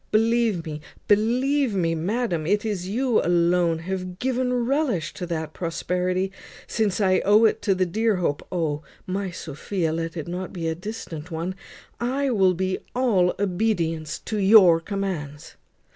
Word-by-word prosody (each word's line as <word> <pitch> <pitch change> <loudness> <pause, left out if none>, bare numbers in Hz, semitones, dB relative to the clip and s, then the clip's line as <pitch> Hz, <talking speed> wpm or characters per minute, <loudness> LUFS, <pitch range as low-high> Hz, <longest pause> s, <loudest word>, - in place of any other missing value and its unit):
Believe 225 -4 +2
me, 155 -1 -6 0.3
believe 245 +4 +2
me, 165 -3 +1
madam, 175 -1 -1
it 205 +3 +1
is 195 -4 -2
you 240 +3 +1
alone 170 -1 +2
have 180 +1 -5
given 255 +2 0
a - - +1
relish 245 - 0
to 180 - -6
that 160 -2 -3
prosperity, 180 +2 -1 0.3
since 215 -4 0
I 190 -2 +3
owe 210 +2 +5
to - - +7
it 220 - +2
the 190 -3 +2
dear 220 +4 +1
hope 170 -5 -1
O! 160 -5 -1 0.2
my 190 +1 -2
Sophia, 165 +1 -3
let 165 +1 -3
it 155 - -5
not 180 +2 -4
be 170 -3 -3
a 160 - 0
distant 175 -4 -7
one. 170 +2 -3 0.5
I 265 +3 0
will 190 -5 +3
be 185 +1 -1 0.2
all 210 -9 +2
obedience 175 -6 -1
to 215 - -2
your 190 -4 +7
commands. 165 -6 -5
185 Hz, 160 wpm, -24 LUFS, 165-220 Hz, 0.5 s, to